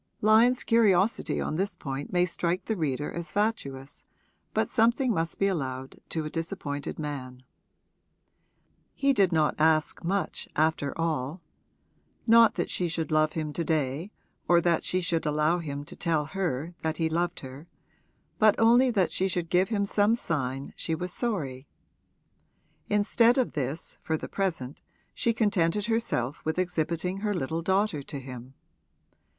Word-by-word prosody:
Lyon's 225 Hz, +4 st, +5 dB
curiosity 215 Hz, -3 st, +2 dB
on 155 Hz, -, -2 dB
this 195 Hz, +3 st, -1 dB
point 135 Hz, 0 st, -5 dB
may 180 Hz, -1 st, +3 dB
strike 175 Hz, +1 st, -2 dB
the 220 Hz, -, -1 dB
reader 145 Hz, -5 st, -2 dB
as 170 Hz, 0 st, -4 dB
fatuous, 145 Hz, -11 st, -2 dB, 0.5 s
but -, -, +1 dB
something 235 Hz, +1 st, +2 dB
must 165 Hz, -2 st, -2 dB
be 195 Hz, -, +1 dB
allowed 135 Hz, -8 st, -3 dB
to 160 Hz, -2 st, -3 dB
a -, -, -3 dB
disappointed 165 Hz, -4 st, -4 dB
man. 130 Hz, -4 st, -6 dB, 1.5 s
He 275 Hz, 0 st, +2 dB
did 195 Hz, -6 st, +3 dB
not 155 Hz, -2 st, +2 dB
ask 155 Hz, -1 st, +2 dB
much 185 Hz, 0 st, -2 dB
after 155 Hz, -2 st, 0 dB
all; 160 Hz, -1 st, -2 dB, 0.9 s
not 230 Hz, -1 st, +6 dB
that 175 Hz, -, -2 dB
she 180 Hz, -, 0 dB
should 160 Hz, -2 st, -3 dB
love 155 Hz, 0 st, +3 dB
him 155 Hz, -2 st, -3 dB
to 170 Hz, -, -2 dB
day 155 Hz, +3 st, -1 dB, 0.4 s
or 175 Hz, -1 st, +5 dB
that 170 Hz, -1 st, +1 dB
she 185 Hz, -, 0 dB
should 170 Hz, -2 st, 0 dB
allow 155 Hz, +3 st, +2 dB
him 145 Hz, -3 st, -5 dB
to -, -, -8 dB
tell 160 Hz, -3 st, 0 dB
her 165 Hz, -2 st, -3 dB
that 160 Hz, -1 st, -2 dB
he 165 Hz, -, +1 dB
loved 170 Hz, +2 st, -1 dB
her, 135 Hz, +4 st, -10 dB, 0.7 s
but 215 Hz, -1 st, +6 dB
only 240 Hz, +3 st, +5 dB
that 195 Hz, -7 st, +1 dB
she 190 Hz, -, +1 dB
should 175 Hz, -3 st, -2 dB
give 185 Hz, +1 st, +3 dB
him 205 Hz, -3 st, 0 dB
some 205 Hz, +2 st, +3 dB
sign 135 Hz, -, -3 dB
she 165 Hz, -, -2 dB
was 180 Hz, +2 st, -4 dB
sorry. 145 Hz, -, -3 dB, 1.2 s
Instead 230 Hz, +4 st, +3 dB
of 255 Hz, -, +1 dB
this, 145 Hz, +2 st, -2 dB
for 160 Hz, -, -1 dB
the -, -, -7 dB
present, 165 Hz, -9 st, -3 dB, 0.3 s
she 235 Hz, -, +1 dB
contented 205 Hz, -4 st, +1 dB
herself 190 Hz, -, -1 dB
with 160 Hz, +2 st, -2 dB
exhibiting 180 Hz, 0 st, -1 dB
her 205 Hz, 0 st, -1 dB
little 160 Hz, +2 st, -2 dB
daughter 190 Hz, -3 st, +1 dB
to 140 Hz, +1 st, -7 dB
him. 130 Hz, -1 st, -9 dB
170 Hz, 155 wpm, -27 LUFS, 150-200 Hz, 1.5 s, not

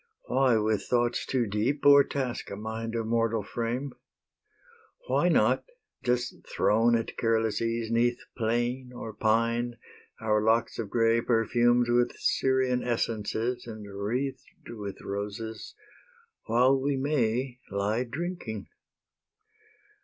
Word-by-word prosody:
Why 130 Hz, -2 st, +3 dB
with 110 Hz, -1 st, +1 dB
thoughts 120 Hz, -1 st, +1 dB
too 125 Hz, -3 st, +1 dB
deep 110 Hz, +8 st, -1 dB
O'ertask 140 Hz, -3 st, +4 dB
a 100 Hz, -, -5 dB
mind 110 Hz, +2 st, -5 dB
of 115 Hz, -1 st, -1 dB
mortal 115 Hz, -1 st, +1 dB
frame? 120 Hz, +6 st, -3 dB, 1.1 s
Why -, -, +2 dB
not, -, -, +3 dB, 0.4 s
just 125 Hz, 0 st, -1 dB
thrown 115 Hz, +3 st, +3 dB
at 115 Hz, -1 st, -2 dB
careless 115 Hz, -1 st, +1 dB
ease 115 Hz, 0 st, -1 dB
'Neath 120 Hz, +1 st, +2 dB, 0.2 s
plane 120 Hz, +2 st, -1 dB
or 115 Hz, -2 st, -6 dB
pine, 115 Hz, +3 st, +1 dB, 0.4 s
our 110 Hz, -2 st, +1 dB
locks 115 Hz, +2 st, +1 dB
of 110 Hz, -3 st, -3 dB
grey 115 Hz, +1 st, +3 dB
Perfumed 120 Hz, +1 st, +3 dB
with 120 Hz, 0 st, +2 dB
Syrian 130 Hz, -1 st, +1 dB
essences 115 Hz, +1 st, -2 dB
And 110 Hz, -2 st, -8 dB
wreathed 125 Hz, +7 st, -4 dB
with 100 Hz, -4 st, -6 dB
roses, 105 Hz, +2 st, -5 dB, 0.7 s
while 130 Hz, +3 st, +3 dB
we 140 Hz, 0 st, 0 dB
may, 130 Hz, -2 st, 0 dB
Lie 105 Hz, +5 st, 0 dB
drinking? 140 Hz, -, -5 dB
115 Hz, 115 wpm, -28 LUFS, 110-125 Hz, 1.1 s, O'ertask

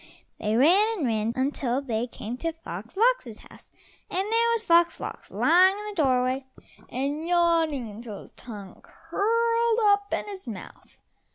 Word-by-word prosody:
They 215 Hz, +1 st, 0 dB
ran 395 Hz, -, +4 dB
and 315 Hz, -, -1 dB
ran 220 Hz, -1 st, 0 dB
until 265 Hz, -1 st, 0 dB
they 240 Hz, -4 st, -2 dB
came 235 Hz, 0 st, -6 dB
to 330 Hz, +4 st, -2 dB
Fox 230 Hz, -, -9 dB
lox's -, -, +2 dB
house, -, -, -17 dB, 0.4 s
and -, -, -4 dB
there 465 Hz, +1 st, +3 dB
was 455 Hz, -1 st, -1 dB
Fox 340 Hz, -3 st, +3 dB
lox -, -, -7 dB
lying 370 Hz, +3 st, +4 dB
in 420 Hz, -, -7 dB
the -, -, -6 dB
doorway 260 Hz, 0 st, +1 dB, 0.4 s
and 285 Hz, +5 st, -3 dB
yawning 335 Hz, -7 st, +2 dB
until 215 Hz, 0 st, -8 dB
his -, -, -16 dB
tongue 205 Hz, -5 st, -10 dB
curled 460 Hz, +2 st, 0 dB
up 405 Hz, -1 st, +3 dB
in -, -, -1 dB
his 385 Hz, -8 st, -8 dB
mouth. 210 Hz, -5 st, -10 dB
320 Hz, 160 wpm, -26 LUFS, 245-405 Hz, 0.4 s, ran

